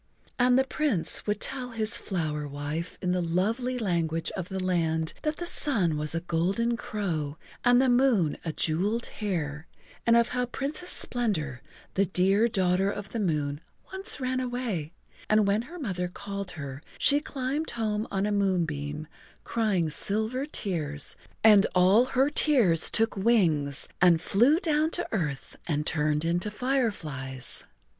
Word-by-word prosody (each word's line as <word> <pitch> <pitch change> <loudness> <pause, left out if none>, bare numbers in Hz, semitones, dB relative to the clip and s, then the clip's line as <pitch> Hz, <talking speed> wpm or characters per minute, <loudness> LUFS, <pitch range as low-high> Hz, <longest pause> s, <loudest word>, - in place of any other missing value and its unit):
And 250 0 +5
the 265 - +5
Prince 265 - 0
would 210 - 0
tell 255 -2 -2
his 220 0 0
flower 155 -6 -3
wife 145 +4 -5
in 180 - +1
the 180 0 +1
lovely 220 +10 0
language 165 -7 -1
of 185 -2 -5
the 190 - -3
land 165 -3 0
that 305 -1 -2
the 350 - -4
sun 210 - +2
was 150 +1 -1
a 165 - -1
golden 190 +8 0
crow 165 -11 -3 0.3
and 245 0 +5
the 265 - +4
moon 245 - +3
a 165 - -2
jeweled 195 +10 0
hare, 160 -7 -4 0.4
and 230 0 +6
of 235 0 +3
how 250 0 -1
Princess 295 +8 -3
Splendor, 160 - -2 0.3
the 195 - +2
dear 195 +4 +3
daughter 190 -2 +1
of 205 0 -5
the 230 - -3
moon, 150 -6 -1 0.3
once 380 -4 -1
ran 255 0 -1
away, 245 -11 -3 0.4
and 215 -1 +4
when 200 +2 +2
her 335 +9 -10
mother 185 - -2
called 200 +1 -6
her 140 -1 -6 0.2
she 285 0 +4
climbed 285 +1 -3
home 215 -1 -2
on 195 0 -1
a 210 - 0
moonbeam 160 -7 -1 0.4
crying 210 -7 0
silver 220 - -1
tears, 155 - -2 0.3
and 210 -2 +7
all 190 +7 +5
her 265 +2 +1
tears 235 - +4
took 225 0 +2
wings 175 - +2
and 175 -2 +6
flew 240 - +3
down 310 -3 +2
to 350 +1 -2
earth 150 - -3
and 150 -2 -1
turned 150 0 +1
into 175 +5 0
fireflies. 160 - -2
195 Hz, 155 wpm, -27 LUFS, 165-245 Hz, 0.4 s, and